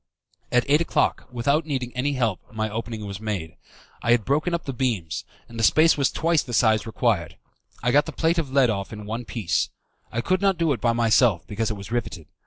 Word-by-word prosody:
At 125 0 +3
eight 150 +3 +4
o'clock, 170 - 0
without 140 +6 +1
needing 130 -4 -3
any 140 +3 0
help, 115 -8 0
my 110 -1 -2
opening 110 -1 -5
was 100 -1 -6
made. 95 -7 -4 0.5
I - - -3
had 120 -3 +4
broken 150 +6 +1
up 170 -1 -2
the 135 - -3
beams, 115 -10 -2 0.2
and 115 -1 -9
the - - 0
space 160 +8 +5
was 140 -2 +1
twice 165 -1 +2
the 120 -2 -4
size 110 -2 +3
required. 105 - 0 0.5
I 125 - +2
got 145 +3 +4
the - - -4
plate 165 +1 +1
of 145 -5 -3
lead 135 -4 +4
off 100 -2 -4
in 105 -1 -8
one 115 +3 -4
piece. 105 -9 -1 0.4
I 115 - -1
could 185 +8 0
not 195 -2 +2
do 165 -3 +2
it 120 - -6
by 115 -1 +2
myself, 115 -5 +3
because 110 +2 -2
it 110 - -3
was 100 +2 -9
riveted. 100 -9 -3
120 Hz, 220 wpm, -24 LUFS, 110-140 Hz, 0.5 s, space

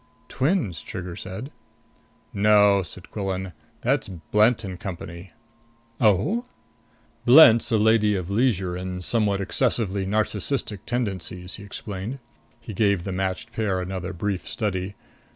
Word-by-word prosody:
"Twins," 130 - 0
Trigger 90 -3 -6
said. 95 - -7 0.8
"No," 105 -1 +5
said 90 0 -11
Quillan. 95 -3 -3 0.3
"That's - - +1
Blent 105 +6 +2
and 95 -2 -6
Company." 85 -1 -7 0.7
"Oh?" 115 - +2 0.8
"Blent's 120 -4 +7
a 110 - +4
lady 105 -1 +4
of 90 -3 -3
leisure 100 -6 +1
and 90 0 -5
somewhat 105 -2 +1
excessively 100 -2 0
narcissistic 105 +2 -1
tendencies," 95 -6 -3
he 100 - -10
explained. 100 +4 -6 0.4
He 110 - -8
gave 100 -3 +2
the 95 - -4
matched 95 +4 -3
pair 100 -4 0
another 95 0 -4
brief 95 +1 -3
study. 100 -3 -2
100 Hz, 120 wpm, -24 LUFS, 95-110 Hz, 0.8 s, Blent's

